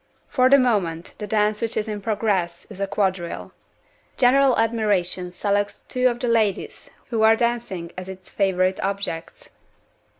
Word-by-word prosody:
For 255 -1 +3
the 280 - +8
moment, 190 -10 0
the 210 - -5
dance 210 +1 +1
which 230 -1 -2
is 215 0 -1
in 210 -1 -4
progress 200 -6 -1
is 195 - -10
a 195 - -1
quadrille. 190 -4 -2 0.7
General 265 +1 +4
admiration 205 -6 0
selects 205 +2 -1
two 255 0 +2
of 240 -1 -1
the 245 - -1
ladies 220 -4 0 0.2
who 225 -2 0
are 220 0 +6
dancing 230 -8 -2
as 185 +1 -7
its 185 -1 -10
favorite 190 -1 +1
objects. 195 -4 -4
205 Hz, 155 wpm, -23 LUFS, 185-230 Hz, 0.7 s, the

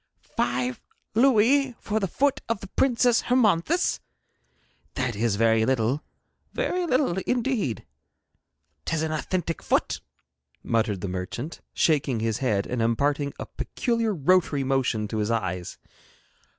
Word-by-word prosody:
'Five 125 +1 -1 0.3
louis 255 +3 +4
for 220 +1 -1
the 195 - -1
foot 280 +9 +1
of 230 -3 0
the 195 - -9
Princess 245 -1 +3
Hermonthis! 250 - +2 1.0
That 130 -4 -1
is 110 0 +1
very 115 +1 +3
little, 130 +3 +1 0.5
very 365 -8 -1
little 255 - +1
indeed. 235 - -1 1.0
'Tis 160 -1 -1
an 160 - -1
authentic 165 +2 -2
foot,' - - 0 0.6
muttered 110 -5 0
the 100 - -3
merchant, 95 - -5
shaking 140 -6 +2
his 115 +1 -1
head, 105 -7 +1
and 125 -2 -2
imparting 140 +5 +1
a - - -5
peculiar 230 -4 -1
rotary 155 -2 +2
motion 130 -5 0
to 110 +1 -3
his 105 +1 0
eyes. 95 -6 -2
145 Hz, 125 wpm, -26 LUFS, -, 1.0 s, louis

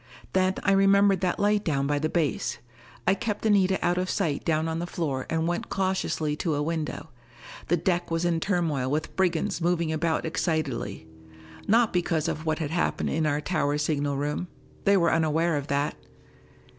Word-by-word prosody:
Then 185 0 +2
I 200 - +3
remembered 195 0 +4
that 180 -2 0
light 205 0 +2
down 140 -4 0
by 145 +1 +1
the 155 +2 0
base! 160 -4 -1 0.5
I - - +4
kept 215 +1 -3
Anita 195 -3 +4
out 175 +1 +2
of 185 0 -2
sight 160 -9 -1
down 160 0 +1
on 160 0 -2
the 175 - -3
floor 140 -7 -3
and 165 0 0
went 175 0 -2
cautiously 185 -5 -1
to 160 -2 -1
a 145 - 0
window. 160 0 -3 0.6
The 175 - +2
deck 175 +1 0
was 165 +1 0
in 170 -1 +1
turmoil 165 -9 0
with 150 +3 -2
brigands 185 +1 0
moving 170 -1 +1
about 160 +1 0
excitedly. 145 - -2 0.6
Not 230 +1 +4
because 170 -3 0
of 155 +1 -3
what 155 0 +1
had 155 -3 -3
happened 175 - 0
in 155 0 +1
our 145 0 0
tower 145 -3 0
signal 145 -2 0
room: 150 +5 -2 0.4
they 200 0 +5
were 170 -2 +3
unaware 160 +1 +2
of 145 -1 -3
that. 145 +1 0
165 Hz, 180 wpm, -26 LUFS, 150-185 Hz, 0.6 s, they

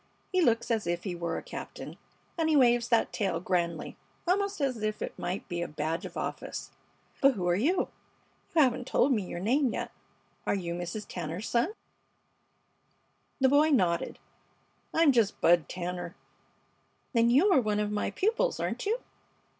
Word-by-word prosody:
He 370 -1 +3
looks 230 -6 +2
as 225 -2 0
if 175 0 -1
he 190 - -3
were 170 -1 -3
a - - -6
captain, - - -8 0.4
and 325 -2 +1
he 310 - +3
waves 240 -3 +4
that 230 -2 +2
tail 195 -3 0
grandly, 170 -3 -1 0.3
almost 400 +1 +1
as 260 -6 -1
if 215 0 -1
it - - -4
might 180 +3 -3
be 175 -2 -3
a 170 - -2
badge 155 +3 -3
of - - -11
office. - - -5 0.5
But 275 -1 +5
who 180 -3 -2
are 175 - +3
you? 325 - +1 0.7
You 315 - +7
haven't 250 -1 0
told 275 - +3
me 225 -5 +2
your 180 -2 -5
name 250 +7 +2
yet. - - -3 0.6
Are - - +2
you 175 -3 -3
Mrs. 175 +4 -4
Tanner's 175 +4 -5
son?" 245 - +1 1.7
The 265 -1 +5
boy 295 +3 +5
nodded. 180 - +1 0.7
"I'm 325 -3 +5
just 230 -6 +2
Bud 170 -4 +4
Tanner." 175 -1 -4 1.0
"Then 230 -1 +4
you 300 +12 +5
are 270 - +5
one 210 -2 0
of 210 0 -1
my 210 - -1
pupils, 460 +5 0
aren't - - -2
you? 460 +4 0
220 Hz, 170 wpm, -29 LUFS, 175-280 Hz, 1.7 s, You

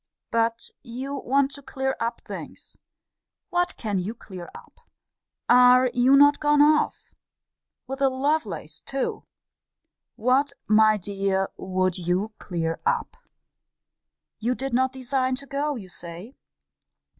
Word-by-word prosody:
But 230 0 0
you 260 +3 -6
want 275 0 +1
to 280 - -10
clear 265 0 -2
up 230 +1 -2
things - - -9 0.8
what 355 0 0
can 210 -4 -2
you 200 +6 -4
clear 185 -6 -10
up? - - -14 0.7
Are 250 0 +6
you 250 +2 +5
not 285 +1 +6
gone 295 -1 +3
off? 300 +1 +3 0.7
With 270 +2 -6
a 270 - +5
Lovelace 260 - -2
too? 270 -1 -3 0.9
What, 260 +5 +2
my 215 0 +5
dear, 195 0 -1
would 185 -1 -1
you 180 +5 -1
clear 165 -3 -3
up? 470 0 -1 1.2
You 240 +3 0
did 270 0 -4
not 260 +1 +2
design 260 0 -1
to 275 +2 -8
go, 285 +1 -2
you 205 -7 -8
say. 175 +7 -9
250 Hz, 125 wpm, -25 LUFS, 200-275 Hz, 1.2 s, Are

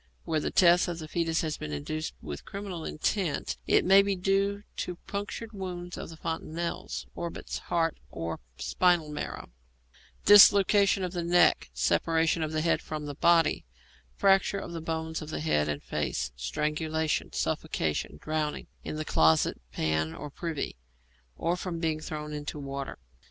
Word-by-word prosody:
Where 155 - 0
the - - -1
death 175 -1 +5
of 175 -1 -3
the 155 -2 -7
foetus 165 0 0
has 155 -2 -2
been 75 - -6
induced 155 - -4
with 75 -2 -6
criminal 195 -4 -6
intent, 170 0 -1
it - - +4
may 195 +2 +8
be 200 0 0
due 195 +2 +1
to 180 - -3
punctured 205 +3 -5
wounds 180 -3 -5
of - - -7
the 165 - -10
fontanelles, 165 +1 -4
orbits, 170 -1 -5
heart, 165 -2 0
or 80 0 -4 0.2
spinal 175 -4 +2
marrow; 150 - -5 0.7
dislocation 200 -1 +7
of 180 -1 -3
the 175 - -2
neck; 175 - +4
separation 160 - +2
of 155 -1 -1
the 155 -1 0
head 165 +1 +2
from 155 -1 -5
the 145 - -4
body; 165 +2 +3 0.5
fracture 195 0 +3
of 190 - -6
the 165 - -4
bones 160 0 -3
of 155 - -7
the - - -3
head 75 - +1
and 75 -1 -3
face; 60 0 -2
strangulation; 150 - -1
suffocation; 75 -2 -2
drowning 155 - -2 0.2
in - - -4
the 155 0 -3
closet 80 - +3
pan 80 0 0
or 150 - -7
privy, 160 - -4 0.6
or 170 +1 0
from 180 -2 -4
being 160 -2 0
thrown 150 -1 -5
into 150 0 -5
water. 140 -1 -5
160 Hz, 160 wpm, -29 LUFS, 150-180 Hz, 0.7 s, may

